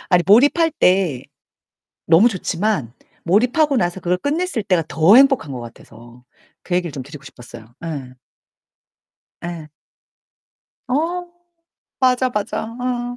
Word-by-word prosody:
아니 180 -2 +3
몰입할 290 - +4
때 180 - +1 0.8
너무 170 +8 +5
좋지만 190 - -2 0.3
몰입하고 250 - +2
나서 175 -2 -1
그걸 180 0 -1
끝냈을 295 - -2
때가 180 -5 +1
더 160 +9 +5
행복한 270 - +4
것 125 - -6
같아서 120 +1 -14 0.4
그 180 - -4
얘기를 175 -4 -1
좀 135 - -6
드리고 140 +1 -12
싶었어요. 120 -3 -13
예. 140 -6 -6 1.3
예. 165 -3 -7 1.2
어. 345 +6 -2 0.7
맞아, 255 0 +2
맞아. 210 -2 -3 0.2
응. 245 -1 -3
185 Hz, 235 characters per minute, -19 LUFS, -, 1.3 s, 너무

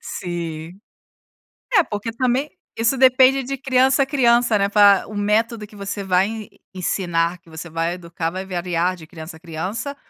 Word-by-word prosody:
Sim. 170 0 -6 0.9
É, 385 -6 +6
porque 210 -1 -5
também 255 +4 0 0.3
isso 230 +4 +2
depende 260 +1 +5
de 275 +2 -4
criança 265 +1 +2
a - - +1
criança, 240 -4 +3
né, 200 0 +1
pra 200 -2 +5
o 215 - -9
método 215 +1 0
que 210 - -17
você 200 0 -5
vai 185 0 +2
en 220 -2 -7 0.3
ensinar, 175 -1 -1
que 170 - -22
você 160 +2 -8
vai 165 +2 -1
educar, 170 -2 -4
vai 185 +2 -5
variar 180 0 -1
de 160 -3 -13
criança 160 0 -10
a - - -17
criança, 185 - -5
200 Hz, 170 wpm, -21 LUFS, 175-240 Hz, 0.9 s, É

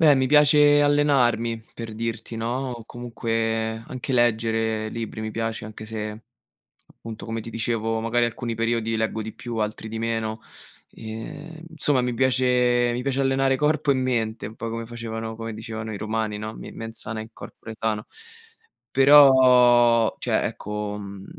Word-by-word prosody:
Beh, 150 -3 +6
mi 130 0 +2
piace 150 +1 +6
allenarmi 125 -6 +2
per 115 -2 -7
dirti, 115 +1 -4
no, 120 +4 -2
o 120 -2 -9
comunque 115 -1 -2
anche 130 +1 -5
leggere 115 -2 +1
libri 115 0 -5
mi 110 0 -4
piace, 115 0 -3
anche 110 0 -9
se 105 0 -5 0.6
appunto, 110 -1 -10
come 115 0 -3
ti 115 - -8
dicevo, 115 -1 -1
magari 120 +1 +1
alcuni 115 0 -4
periodi 115 0 -1
leggo 110 0 -1
di 110 +1 -7
più, 120 -2 -6
altri 110 0 -3
di 110 +1 -5
meno. 115 -1 -2 0.5
Ehm, 145 +9 -8
insomma, 150 -4 +2
mi 125 -1 -1
piace 125 -1 +3
mi 125 - -3
piace 135 0 -1
allenare 135 0 +2
corpo 150 0 +1
e - - +4
mente 120 -5 -1
un 110 - -9
po' 115 - -5
come 115 0 -5
facevano 115 -1 -5
come 115 0 -6
dicevano 110 0 -6
i - - -4
romani, 110 0 -2
no, 110 +1 -6
"me - - -9
mens 115 0 -7
sana 110 0 -4
in 110 - -8
corpore 110 0 -10
sano." 110 -1 -2 0.9
Però 125 -4 +6
cioè, - - 0
ecco, 105 0 -4
mhmm, 100 -1 -9
115 Hz, 165 wpm, -24 LUFS, 110-125 Hz, 0.9 s, Beh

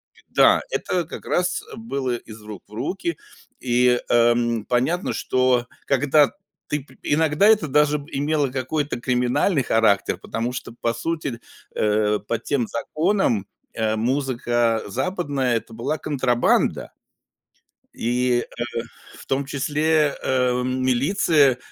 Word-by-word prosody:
И - - -21
да, - - +5
это 185 - -1
как 160 - -9
раз 180 0 0
было 140 - -2
из 110 -2 -12
рук 105 -2 -9
в 105 - -21
руки, 170 - -3 0.4
и, 125 0 +3
эм, 120 -1 +3
понятно, 130 +10 0
что 130 -1 +1 0.2
когда 145 +2 +4 0.4
ты 150 -2 -2
пр - - -20
иногда 155 +4 +2
это 215 -6 +4
даже 150 +1 +3
имело 145 0 0
какой-то 135 +1 -2
криминальный 125 +6 +1
характер, 105 -6 +2
потому 115 +4 -3
что 125 -2 -6
по 115 0 -2
сути, 140 -1 -3 0.3
э, 105 0 +1
по 115 - -1
тем 120 +1 -1
законам, 155 - 0 0.3
э, 110 -1 0
музыка 120 -2 0
западная- 140 - -1
это 115 0 -5
была 120 +7 -2
контрабанда 130 -5 +1 1.0
и, 125 +1 +1 0.2
э, 120 - -1 0.6
в - - -13
том 135 +1 0
числе, 150 +2 +1
э, 125 -1 +1
милиция, 130 +3 +2
130 Hz, 125 wpm, -23 LUFS, 120-150 Hz, 1.0 s, да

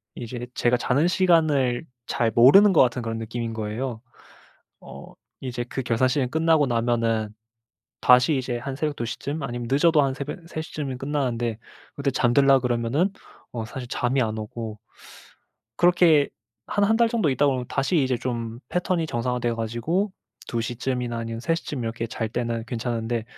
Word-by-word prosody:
이제 120 +1 -6
제가 120 +1 +2
자는 135 +6 +2
시간을 155 -8 +2 0.2
잘 115 - +1
모르는 190 - +7
것 - - +6
같은 125 0 +2
그런 115 0 -3
느낌인 115 +1 -4
거예요. 110 +2 -4 0.8
어 - - -11 0.3
이제 125 -2 -3
그 135 - -3
결산 120 +2 +2
시즌 130 -1 0
끝나고 160 0 +3
나면은 115 -2 0 0.7
다시 125 +4 +5
이제 125 -2 -2
한 135 +2 -5
새벽 150 +1 -2
2 120 - -2
시쯤 140 +6 -4
아니면 120 -3 -4
늦어도 150 +2 +4
한 135 -1 0
3 155 +3 -6
시쯤이면 140 -5 -5
끝나는데 125 -5 -1 0.4
그때 140 -1 -1
잠들려 135 +2 +4
그러면은 125 +8 0 0.4
어 115 -2 -4
사실 125 +3 -7
잠이 130 +2 0
안 110 -2 -1
오고 110 0 -6 1.0
그렇게 175 -4 +5 0.4
한 205 - +1
1 220 +2 +3
달 235 0 +4
정도 225 -8 +1
있다 135 +2 +2
보면 130 -3 0
다시 135 +6 0
이제 130 -1 +1
좀 115 -2 -4
패턴이 180 -1 0
정상화되어 120 -2 -1
가지고 120 - -1 0.3
2 115 - -2
시쯤이나 120 0 -3
아니면 115 0 -5
3 165 +7 +1
시쯤 150 -5 -5
이렇게 115 0 -3
잘 115 0 -3
때는 115 0 -2
괜찮은데 115 -1 -2
125 Hz, 320 characters per minute, -24 LUFS, 115-145 Hz, 1.0 s, 모르는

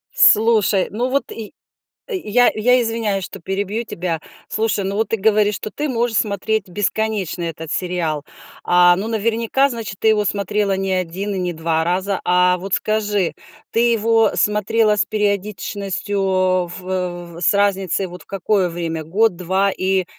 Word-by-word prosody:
Слушай, 220 - +4
ну 245 +5 -1
вот, 275 +2 +1
я 220 -3 -7 0.6
я 245 - +2
я 250 +3 +3
извиняюсь, 225 -4 -1
что 195 - -8
перебью 200 +5 -3
тебя. 170 -5 -3 0.3
Слушай, 215 -2 0
ну 195 +1 -2
вот 220 - 0
ты 225 - 0
говоришь, 210 0 +2
что 210 +3 -6
ты 300 +1 -3
можешь 235 -2 0
смотреть 210 0 -1
бесконечно 205 -1 -2
этот 165 -1 -5
сериал. 170 -5 -2 0.4
А, 175 0 +6
ну 205 +4 -3
наверняка, 230 +5 +1
значит, 225 -6 -6
ты 220 - +3
его 210 -1 +2
смотрела 200 0 0
не 195 0 -2
1 185 +3 -2
и - - -3
не 180 -1 -2
2 160 0 0
раза. 185 +3 0
А 180 0 +4
вот 190 +1 -6
скажи, 210 -4 0 0.4
ты 235 +1 +3
его 225 0 +3
смотрела 210 +1 +2
с 195 - +2
периодичностью 205 -1 -2 0.6
в 175 -2 -4
с 170 - +3
разницей 195 -2 +1
вот 180 -2 -11
в - - -34
какое 195 0 0
время, 165 -2 -4
год, 200 +4 +2
2? 190 +2 +1
И 190 0 0
200 Hz, 160 wpm, -20 LUFS, 180-220 Hz, 0.6 s, А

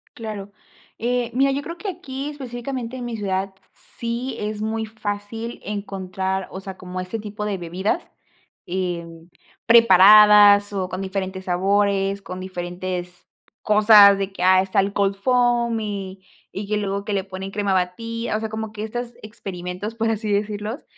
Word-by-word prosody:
Claro, 210 -3 -7 0.5
eh, 240 0 -1
mira, 270 +2 +3
yo 275 +1 -1
creo 335 +4 -7
que 410 - -7
aquí 290 -7 -5
específicamente 255 -3 -6
en 245 - -5
mi 240 -1 -4
ciudad 195 -1 -2 0.4
sí 235 +2 -3
es 210 0 -4
muy 220 +1 -2
fácil 220 +1 -5
encontrar, 190 -2 -3
o 190 - -6
sea, 190 -1 -8
como 185 0 -7
ese 185 +5 -4
tipo 210 0 -6
de 205 -2 -2
bebidas, 185 - -2 0.6
em, 170 -2 -4 0.4
preparadas 210 -1 +7
o 190 -2 -2
con 185 +1 -4
diferentes 190 -1 -4
sabores, 195 +2 +1
con 185 -1 -7
diferentes 180 -1 -5 0.4
cosas 210 -1 +7
de 195 0 -3
que, 180 - -4
ah, 185 0 +6
está 190 +2 0
el 195 +1 +1
cold 200 -1 +1
foam 240 +1 +2
y 195 -3 -5 0.3
y 200 +1 -6
que 210 +1 0
luego 200 -1 -2
que 210 - -2
le 195 -1 0
ponen 190 0 -7
crema 200 -1 0
bati 230 +6 -2
o 215 - 0
sea, 220 0 -4
como 220 0 -5
que 215 -1 -8
estas 240 +2 -5
experimentos, 195 -1 -6
por 225 0 0
así 215 -1 -2
decirlos. 210 +4 -2
205 Hz, 165 wpm, -22 LUFS, 190-225 Hz, 0.6 s, preparadas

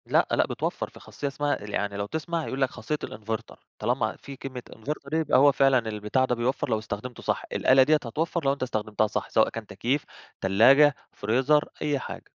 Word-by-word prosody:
لأ، - - +3
لأ - - +3
بتوفّر. - - -3
في - - -15
خاصية 145 - -6
اسمها 145 +1 -1
يعني 100 0 -2
لو 100 - -2
تسمع، 160 +7 -3
هيقول 135 - -4
لك 135 - +3
خاصية 150 - -3
الinverter، 110 +1 -6 0.2
طالما 120 +5 0
في 140 - -10
كلمة 130 -1 -7
inverter 140 +4 -6
يبقى 160 -4 +3
هو 140 +2 +7
فعلًا 135 -1 +4
البتاع 105 +5 0
ده 125 - 0
بيوفّر 125 +3 -1
لو 110 -2 +1
استخدمته 110 +3 -6
صح. - - -1
الآلة 130 0 +5
دي 155 +4 +4
هتوفّر 155 +5 -2
لو 135 - +4
أنت 140 - -4
استخدمتها 110 -3 0
صح، 105 - -3
سواء 110 - +3
كان 115 -2 -7
تكييف، 135 +5 -1 0.4
تلاجة، 130 +9 +6 0.2
فريزر 130 +8 +2
أي 145 -2 0
حاجة. - - -7
130 Hz, 195 wpm, -26 LUFS, 110-145 Hz, 0.4 s, هو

